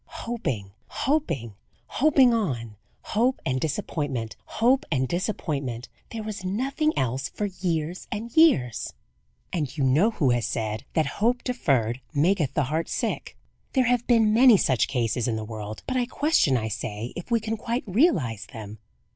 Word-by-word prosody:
Hoping, 135 - -3 0.2
hoping, 165 - -1 0.3
hoping 270 -3 +4
on; 125 - -2 0.3
hope 245 +5 +1
and 130 0 0
disappointment, 140 -7 -2
hope 255 +4 +2
and 130 -3 +1
disappointment 140 - -3 0.2
there 225 -1 -5
was 210 -3 -6
nothing 270 - 0
else 130 +2 -1
for 210 - -3
years 180 -3 -3
and 225 +3 -4
years; 285 - +4 0.6
and 150 -3 -2
you 140 - +1
know 145 - +4
who 150 - +1
has 120 -1 +1
said, 110 -2 -3
that 160 - +3 0.2
"Hope 240 +2 +2
deferred 130 - 0
maketh 160 -1 +2
the 145 - +3
heart 155 +5 -2
sick." - - -3 0.4
There 260 -2 +3
have 245 -1 +1
been 225 -3 +4
many 240 -1 +7
such 130 -9 +2
cases 120 -2 0
in 115 - 0
the 110 0 -4
world, 110 -1 -7
but 260 - -1
I 245 -1 +1
question, 280 - +2
I 110 -2 -2
say, 110 +1 -4
if 175 - -7
we 235 -1 +3
can 220 +1 -2
quite 235 +3 -2
realize 185 - +1
them. 110 -1 -8
160 Hz, 160 wpm, -26 LUFS, -, 0.6 s, many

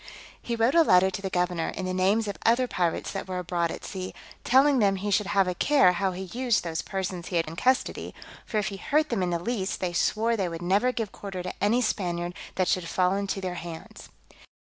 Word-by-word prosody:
He 235 - -3
wrote 230 +3 +2
a 335 - +6
letter 190 - +5
to 190 - -5
the 195 - -3
governor, 180 -2 0
in 185 - -5
the 185 - -2
names 200 +4 +2
of 200 - -3
other 235 +3 +4
pirates 175 -7 -1
that 195 - -5
were 185 -1 -3
abroad 175 -1 -1
at - - -7
sea, 185 -1 -6 0.3
telling 270 +2 +4
them 200 -3 +3
he 200 +2 -3
should 205 0 +2
have 195 -2 +2
a 180 - 0
care 230 -1 +4
how 190 +1 0
he 185 +1 -5
used 235 +4 0
those 165 -2 -2
persons 185 -3 -4
he 180 - -4
had 165 -1 +2
in 160 - -7
custody; 260 +8 0 0.3
for 220 - -3
if 210 -1 0
he 200 - -7
hurt 305 +9 +1
them 230 -5 -1
in 180 - 0
the 170 - 0
least, 190 +1 -2
they 180 -2 -2
swore 225 +6 +1
they 190 -5 -1
would 165 +1 -6
never 200 +8 +2
give 225 -5 -3
quarter 195 -3 -6
to 180 - -4
any 230 +5 +3
Spaniard 175 -5 -2 0.2
that 185 -1 +1
should 175 -2 0
fall 185 +1 +2
into 200 -1 -2
their 185 -1 -3
hands. 165 -1 -9
190 Hz, 240 wpm, -27 LUFS, 180-220 Hz, 0.3 s, a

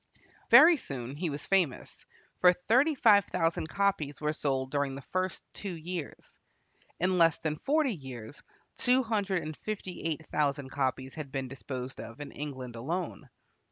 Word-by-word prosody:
Very 330 +1 +9
soon 130 - -5
he 165 +3 -2
was 145 0 -5
famous, 185 -9 0 0.3
for 180 0 +7
thirty 255 - +2
five 210 -6 +6
thousand 165 -2 -1
copies 190 -8 0
were 150 0 0
sold 135 -3 -1
during 140 -2 0
the 140 - -8
first 185 0 -1
two 195 -4 -5
years. 165 -1 -7 0.6
In 185 +1 +2
less 165 -2 +5
than 155 -1 -2
forty 295 -3 +2
years 130 - -9 0.4
two 255 +1 +3
hundred 205 -5 0
and 155 0 -5
fifty 205 -4 -5
eight 160 -1 -3
thousand 140 -2 0
copies 130 -1 -1
have 150 -4 -7
been 135 -1 -3
disposed 130 +1 -6
of 115 +3 -10
in 145 -1 -7
England 130 -5 -6
alone. 155 +3 -4
155 Hz, 155 wpm, -30 LUFS, 135-185 Hz, 0.6 s, Very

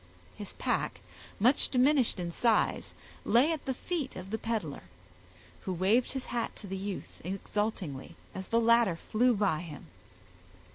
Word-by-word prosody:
His 205 -2 -8
pack, - - -1 0.4
much 250 +7 +5
diminished 260 -4 +3
in 175 -1 -3
size, 225 +4 +1 0.3
lay 260 +7 +4
at 315 -3 -3
the 265 - 0
feet 310 -2 -3
of 185 +1 -8
the 220 - -1
peddler, 210 - -3 0.8
who 190 - -1
waved 205 +9 +2
his 265 -1 -3
hat 235 -1 -2
to - - -8
the 195 0 -4
youth, 195 0 -6
exultingly, 195 -5 -3 0.2
as 190 0 -6
the 230 - +2
latter 230 -5 +4
flew 235 +7 +2
by 195 -6 +1
him. 160 -5 -8
215 Hz, 150 wpm, -30 LUFS, 185-245 Hz, 0.8 s, much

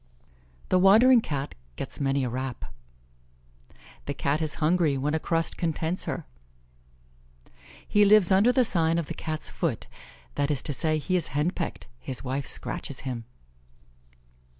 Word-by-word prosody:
"The 185 - +4
wandering 225 +6 +7
Cat 140 -6 -4 0.2
gets - - -6
many 135 -1 +1
a 125 - -1
rap." 120 - -5 1.3
"The 140 - -3
Cat 140 +3 0
is 155 -1 -1
hungry 160 -3 +2
when 145 +3 -1
a 160 - +1
crust 165 +1 -1
contents 165 +1 -1
her." - - -4 1.6
"He 210 - +4
lives 205 -2 +6
under 200 +6 +5
the 255 -1 +3
sign 165 -5 +1
of 170 - -1
the - - -5
Cat's 155 -1 -5
foot;" 155 - -2 0.5
that 145 0 0
is 140 -4 -1
to 145 - -2
say, 155 +4 0
he 185 +5 -1
is 175 - 0
hen 155 +4 +2
pecked 175 - -5
his 130 -4 -5
wife 135 +2 -3
scratches 140 - -3
him. 125 -4 -5
155 Hz, 150 wpm, -27 LUFS, 140-180 Hz, 1.6 s, wandering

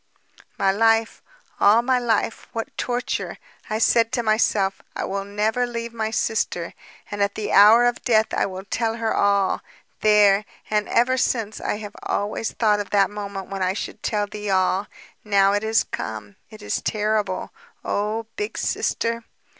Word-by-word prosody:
"My 195 - +3
life, 225 +2 +2 0.4
all 220 +4 +5
my 255 0 +2
life... 225 -2 -1
what 225 -1 -5
torture! 245 0 -3 0.3
I 215 - -1
said 230 0 +3
to 240 -2 0
myself: 215 -3 +1
'I - - -2
will 195 0 -3
never 215 +4 0
leave 235 -1 -5
my 220 -1 -2
sister. 215 -6 -1 0.4
And 205 0 -3
at 200 0 +1
the 215 - -3
hour 215 +4 +7
of 245 0 0
death 220 -3 +2
I - - +1
will 190 0 -7
tell 225 +2 -1
her 225 -1 -1
all 200 -1 +2 0.2
...' - - -42
There! 210 -1 +5 0.3
And 210 -1 0
ever 250 +2 +3
since, 225 -4 -1
I - - -1
have 210 -1 -9
always 210 +2 -2
thought 210 -2 +2
of 205 - -4
that 200 -1 +3
moment 200 -2 -6
when 195 -1 -4
I 185 0 +1
should 200 - -6
tell 210 -2 0
thee 210 0 -6
all. 190 +1 +1 0.4
Now 200 -2 +3
it 205 +1 0
is 220 +1 +2
come. 105 -2 -6
It 215 -1 -13
is - - -2
terrible. 210 -3 -1 0.3
Oh... 215 +2 -1
Big 415 +1 -4
Sister! 230 0 -1
210 Hz, 170 wpm, -23 LUFS, 200-225 Hz, 0.4 s, hour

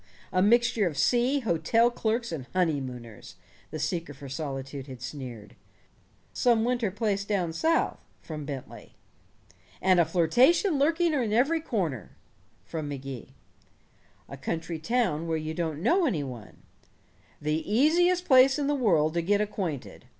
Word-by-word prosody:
"A 185 - +3
mixture 230 0 +3
of 150 -5 -5
sea, 250 - +2
hotel 225 +4 +2
clerks, 235 0 -1
and 140 -6 -5
honeymooners!" 130 - -3 0.3
the 155 - -6
seeker 150 0 -3
for 140 +1 -10
solitude 135 -1 -5
had 130 -2 -9
sneered. 125 -5 -8 0.8
"Some 230 -2 +2
winter 240 -3 0
place 200 0 -1
down 190 -5 -1
South," 325 - +1 0.2
from 155 -2 -7
Bentley. 140 -2 -8 0.8
"And 185 -1 +3
a 170 - +5
flirtation 250 - +3
lurking 325 +3 +2
in 245 -7 0
every 275 +9 +2
corner!" 170 - -3 0.5
from 155 +6 -5
Magee. 135 -4 -7 0.9
"A 140 - -9
country 160 +4 -4
town 175 -5 0
where 160 -1 0
you 155 0 -4
don't 160 -1 -3
know 340 - +3
any 160 - -1
one." 120 -6 -10 0.8
"The 150 +2 -1
easiest 350 +9 +3
place 265 -1 +6
in 290 - -1
the 290 - +1
world 170 - +2
to 170 - 0
get 200 +4 +2
acquainted. 190 - -4
175 Hz, 145 wpm, -27 LUFS, 150-240 Hz, 0.9 s, place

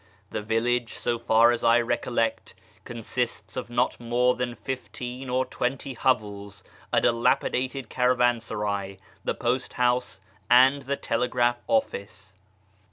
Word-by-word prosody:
The - - -3
village, 115 +2 0
so 120 -1 -1
far 115 0 +5
as 120 -1 -2
I 115 +1 +5
recollect, 120 -1 -1 0.3
consists 120 +1 -4
of 130 - -4
not 120 +1 0
more 120 +1 +2
than 125 -1 -3
fifteen 130 0 -6
or 130 +1 +1
twenty 130 +2 -3
hovels, 105 -5 -1 0.3
a - - +4
dilapidated 125 +2 +1
cara 125 +1 +2
vansaray, 105 -5 -1 0.3
the - - -1
post 125 +2 -1
house, 125 0 0 0.3
and 130 +3 +6
the 140 +1 -2
telegraph 120 +1 0
office. 285 - -2
120 Hz, 125 wpm, -26 LUFS, 115-125 Hz, 0.3 s, and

